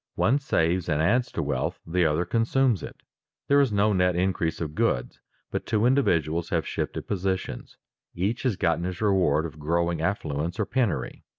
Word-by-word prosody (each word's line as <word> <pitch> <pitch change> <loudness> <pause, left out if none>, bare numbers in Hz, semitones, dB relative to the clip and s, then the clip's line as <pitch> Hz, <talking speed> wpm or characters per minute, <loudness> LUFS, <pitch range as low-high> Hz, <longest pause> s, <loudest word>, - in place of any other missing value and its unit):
One 135 +5 +2
saves 90 - 0
and 75 -2 +1
adds 120 +10 +2
to - - -1
wealth, - - -2
the 85 0 +2
other 80 +3 0
consumes 115 +2 +1
it. - - -8 0.5
There 140 0 +5
is 135 -5 +2
no 105 +1 +2
net 90 -1 +2
increase 90 -3 0
of 75 -3 -4
goods, - - -1 0.3
but - - -3
two 110 0 +1
individuals 85 - +2
have 85 -4 0
shifted - - -3
positions; 95 -1 -3 0.4
each 100 +7 -1
has 125 -6 0
gotten 85 -3 0
his 90 -1 -4
reward 90 -7 +2
of 75 -2 -8
growing 85 +2 0
affluence 85 -1 -2
or 105 - +1
penury. 120 - -1
90 Hz, 175 wpm, -26 LUFS, 80-105 Hz, 0.5 s, There